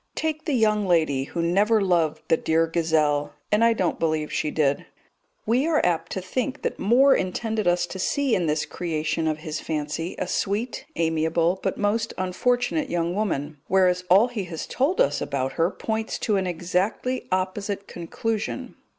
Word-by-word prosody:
Take 315 0 -2
the 305 - 0
young 215 -3 +2
lady 155 -6 +2
who 170 +4 -3
never 205 +6 +3
loved 175 -6 +1
the 165 - +4
dear 160 +1 +2
gazelle 160 -3 +1 0.2
and 210 +2 +4
I 230 0 +5
don't 185 -6 -1
believe 155 -2 -1
she 150 - 0
did; 145 -2 0 0.6
we 250 +7 +2
are 320 -2 +3
apt 165 -2 0
to 190 - -3
think 255 +8 -3
that - - -2
Moore 260 +7 +5
intended 215 +2 -1
us 175 0 +3
to 190 - -8
see 275 +6 +1
in 175 -5 +1
this 150 0 0
creation 160 -1 -2
of 155 -1 0
his 155 -1 -3
fancy 155 +2 -3
a - - -2
sweet, 205 +7 -2
amiable, 165 +2 +1
but - - -2
most 220 +2 0
unfortunate 245 - 0
young 170 0 -1
woman, 155 -8 -2
whereas 180 -1 +3
all 195 +6 +6
he 215 -6 -4
has 165 -3 -5
told 290 +8 0
us 145 +1 +2
about 135 -1 -2
her 165 +5 +1
points 220 +2 -3
to 215 - 0
an 190 -1 0
exactly 180 +9 -1
opposite 195 +2 -2
conclusion. 210 +5 -4
180 Hz, 175 wpm, -24 LUFS, 160-220 Hz, 0.6 s, all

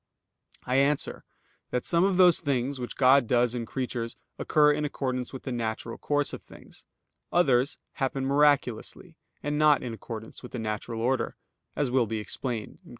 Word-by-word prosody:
I 125 +1 +1
answer 140 +1 +1 0.4
that, 125 - -2
Some 170 0 +3
of 195 -1 +2
those 180 -2 +7
things 135 -2 -1
which 125 - -5
God 130 -1 +5
does 120 0 +2
in 120 -2 -4
creatures 120 -2 -3 0.2
occur 150 -1 +4
in 150 +1 -2
accordance 130 -4 -3
with 130 - -8
the 135 - -4
natural 115 -1 -3
course 145 -1 0
of - - -6
things; - - -16 0.4
others 140 -4 +3
happen 135 -1 -2
miraculously, 140 -4 +1 0.3
and 145 +1 -1
not 150 -2 +5
in 120 -2 -4
accordance 110 0 -8
with 125 - -11
the - - -3
natural 110 +1 -4
order, 130 +2 0 0.4
as 140 -3 0
will 125 -3 +2
be 110 +1 -2
explained 110 +1 -5
(Q. - - -18
130 Hz, 170 wpm, -27 LUFS, 120-145 Hz, 0.4 s, those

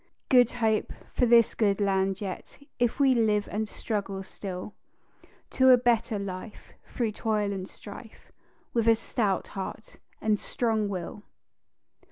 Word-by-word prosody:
"Good 245 -3 +5
Hope" 220 -3 0 0.2
for 245 - +2
this 235 -1 +5
good 205 -3 +1
land 195 -1 +1
yet, 190 -3 -6 0.2
If 240 +2 +1
we 270 -2 +5
live 215 -3 +2
and 215 +1 -2
struggle 195 -4 -3
still 190 +1 -7 0.8
To 260 0 +4
a 255 - +9
better 235 -3 +1
life, 200 +2 -7
through 230 -3 -2
toil 210 -1 -1
and 190 -1 -5
strife, 215 +2 -12 0.4
With 230 -1 +1
a 225 - +7
stout 220 -3 -1
heart 195 +2 -7 0.2
and 215 -1 +1
strong 220 -4 -1
will. 190 +1 -5
215 Hz, 140 wpm, -27 LUFS, 200-230 Hz, 0.8 s, a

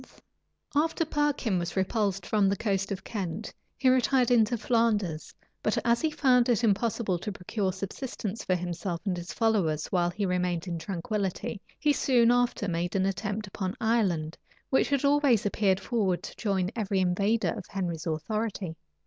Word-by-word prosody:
} - - -51 0.3
After 325 +2 +2
Perkin 295 - 0
was 175 0 -4
repulsed 195 -1 0
from 205 -1 +2
the 200 - +1
coast 195 -2 -1
of 195 -1 -4
Kent, 200 0 -4 0.2
he 265 - +1
retired 255 -1 +4
into 235 0 +4
Flanders; 210 -8 0 0.3
but - - 0
as 235 0 +3
he 315 - +2
found 255 -5 +3
it 240 -1 +2
impossible 205 -3 +1
to 210 +4 -4
procure 190 +1 -2
subsistence 200 +2 -5
for 185 - +1
himself 175 0 -3
and 190 -3 0
his 175 0 -6
followers 195 -10 +1
while 175 -2 +2
he 200 +3 -2
remained 180 -2 0
in 170 -2 -3
tranquillity, 200 +4 -3 0.2
he 295 -1 +2
soon 240 -4 +4
after 245 -4 +1
made 175 0 -2
an 190 -1 +2
attempt 205 +2 -2
upon 190 0 -4
Ireland, 190 -9 0 0.3
which 265 - +3
had 280 -1 +1
always 280 -7 +4
appeared 195 -2 +2
forward 195 -4 0
to - - -8
join 195 -3 0
every 200 -4 0
invader 200 +5 +1
of 200 -5 -7
Henry's 175 -5 -3
authority. 185 +1 -3
200 Hz, 165 wpm, -28 LUFS, 180-235 Hz, 0.3 s, retired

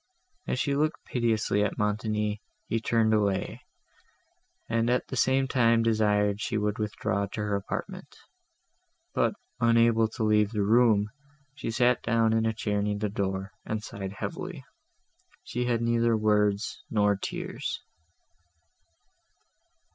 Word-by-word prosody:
As - - -1
she 140 - 0
looked 155 +2 -1
piteously 110 -4 +1
at 105 - -2
Montoni, 105 0 -1 0.3
he 115 - 0
turned 110 -1 +2
away, 100 -3 0 1.1
and 115 +1 +1
at 125 +1 0
the - - -4
same 130 +1 +2
time 115 -3 +3
desired 105 -2 +2
she 110 - -1
would 105 0 -1
withdraw 105 -1 -1
to 105 - -5
her 105 -1 -1
apartment; 100 - -5 1.0
but, - - +1 0.2
unable 115 -1 +4
to 110 +1 -5
leave 105 0 +3
the 105 -2 +1
room, 110 -1 +4 0.4
she 135 - -5
sat 120 +2 +2
down 115 -1 +2
in 115 0 +2
a - - +2
chair 105 -1 -1
near 105 0 -1
the 105 0 -1
door, 95 -1 -3
and 110 0 -3
sighed 100 -4 -6
heavily. - - -6 0.8
She 125 +1 -3
had 120 -1 0
neither 115 -1 +2
words 105 -1 +1
nor 105 -2 +3
tears. 95 - -4
110 Hz, 135 wpm, -28 LUFS, 105-115 Hz, 1.1 s, unable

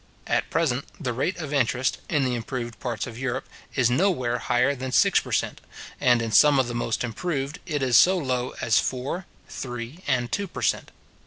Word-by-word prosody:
At - - 0
present, 140 -5 0
the 130 -7 -2
rate 140 +10 -1
of 155 -4 -5
interest, 130 -1 +1
in 145 -4 +2
the 125 - 0
improved 120 0 -4
parts 115 -4 -3
of 120 -1 -8
Europe, 130 0 -3 0.3
is 125 -3 +3
nowhere 130 -6 +1
higher 125 +4 +2
than 130 -1 -5
six - - +5
per - - -9
cent.; - - -1 0.4
and 120 -2 +4
in 115 - -3
some 145 +6 +6
of 130 -2 +2
the 120 - -4
most 120 -1 -1
improved, 140 +3 -3
it 145 -5 -1
is 125 -3 +5
so 185 +7 +6
low 130 -5 -2
as 115 - +4
four, 135 +8 -3 0.2
three, 120 +4 -6
and 125 -3 0
two 200 0 -1
per - - -7
cent. - - 0
130 Hz, 195 wpm, -25 LUFS, 120-145 Hz, 0.4 s, some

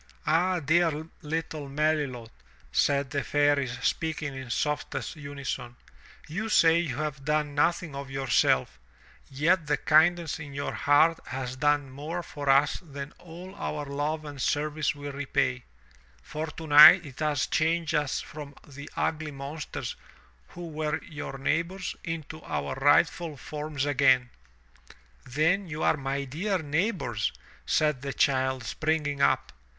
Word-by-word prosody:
"Ah, 180 +3 +2
dear 165 +3 +3 0.3
Uttle 155 -2 -4
Melilot," 140 -5 -1 0.4
said 140 -2 +1
the 140 - -1
Fairies 145 -4 +1
speaking 155 -3 -1
in 130 -2 -7
softest 150 +6 -2
unison, 140 -4 -6 0.5
"you 200 +9 -3
say 165 -5 +5
you 155 -8 -2
have 145 -1 -4
done 150 0 0
nothing 165 +1 +1
of 140 0 -6
yourself, 125 - +1 0.5
yet 155 +4 +1
the 145 - +2
kindness 160 +1 +3
in 145 -3 -8
your 140 - -3
heart 155 +3 +4
has 130 0 -4
done 145 -1 +1
more 155 +6 -5
for 145 -3 -5
us 140 +2 +4
than 140 -4 -8
all 180 +2 -10
our 150 -7 -4
love 145 +2 -2
and 145 -3 -7
service 150 +2 0
will 145 0 -6
repay, 140 -3 -1 0.6
for 155 - -4
tonight 155 +3 +8
it 135 -3 -11
has 150 -5 +1
changed 160 0 0
us 150 -3 0
from 145 -2 -9
the 140 +1 -10
ugly 160 -1 -1
monsters 140 +2 -6 0.5
who 175 -1 -9
were 155 -1 -2
your 145 -2 -7
neighbors 170 +7 -1
into 160 -2 -6
our 70 -1 -3
rightful 150 +3 +2
forms 150 -1 -4
again." 130 -3 +3 1.0
"Then 165 +9 +1
you 155 -1 -4
are - - +4
my 140 -1 -2
dear 175 +9 -1
neighbors," 160 - -1 0.4
said 150 -4 +2
the 140 0 -4
child 130 -2 +1
springing 150 +3 -1
up. - - +2
150 Hz, 135 wpm, -28 LUFS, 140-160 Hz, 1.0 s, tonight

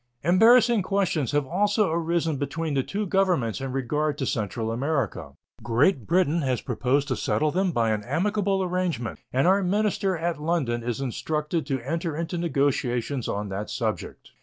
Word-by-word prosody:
Embarrassing 225 - +5
questions 185 - 0
have 145 -1 +1
also 205 - +1
arisen 165 -2 0
between 155 +3 -3
the 135 - +2
two 205 +10 -3
Governments 180 - +1
in 135 -1 -3
regard 145 +3 -1
to 135 - -2
Central 110 0 -2
America. 135 0 -2 0.3
Great 120 - +2
Britain 170 -2 +2
has 130 -4 0
proposed 135 +6 0
to 130 - +1
settle 155 0 0
them 185 +2 +1
by 115 -7 +1
an 105 -1 -1
amicable 195 - 0
arrangement, 175 -10 -2
and 130 +2 +2
our 190 +3 +4
minister 195 -1 0
at 165 -1 -2
London 150 -8 0
is 120 +2 -3
instructed 150 +4 -2
to 135 -3 -1
enter 165 0 -2
into 170 +2 -3
negotiations 140 -5 0
on 105 0 -3
that 100 +2 -4
subject. - - -4
155 Hz, 160 wpm, -25 LUFS, 130-180 Hz, 0.3 s, Embarrassing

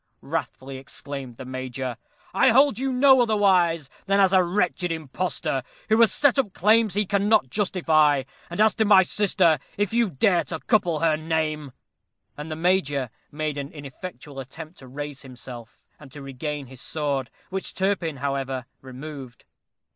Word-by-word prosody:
wrathfully 135 0 -4
exclaimed 135 -2 -7
the 130 - -8
Major. 130 -1 -4 0.4
"I - - +5
hold 265 -1 +4
you 270 0 -1
no 260 0 +6
otherwise 185 - +3 0.2
than 195 +1 +3
as 195 -1 +4
a 190 - +6
wretched 180 -1 0
impostor, 160 -2 -2 0.3
who 220 +2 +4
has 230 - +6
set 285 -2 +3
up 210 -8 0
claims 215 0 +3
he 210 0 +2
cannot 200 - +2
justify; 155 -8 +2 0.3
and 175 - -6
as 215 -1 +5
to 220 - +1
my 200 -2 +7
sister, 180 -5 +2 0.2
if 205 +1 0
you 235 -2 +2
dare 175 +3 +2
to 160 - -5
couple 175 -9 +1
her 160 -2 +3
name 155 -2 -2 0.3
" - - -53
and 150 +2 -7
the 155 - -3
Major 150 - +1 0.2
made 150 -1 -3
an 140 0 -6
ineffectual 145 0 -9
attempt 155 +6 -9
to 130 - -12
raise 145 +2 -6
himself, 125 -3 -11 0.2
and 140 -3 -14
to 145 - -9
regain 140 +2 -5
his 130 0 -12
sword, 140 -5 -2 0.2
which 190 0 -3
Turpin, 185 -6 -1
however, 135 -2 -3 0.2
removed. 130 -1 -9
160 Hz, 160 wpm, -24 LUFS, 135-195 Hz, 0.4 s, my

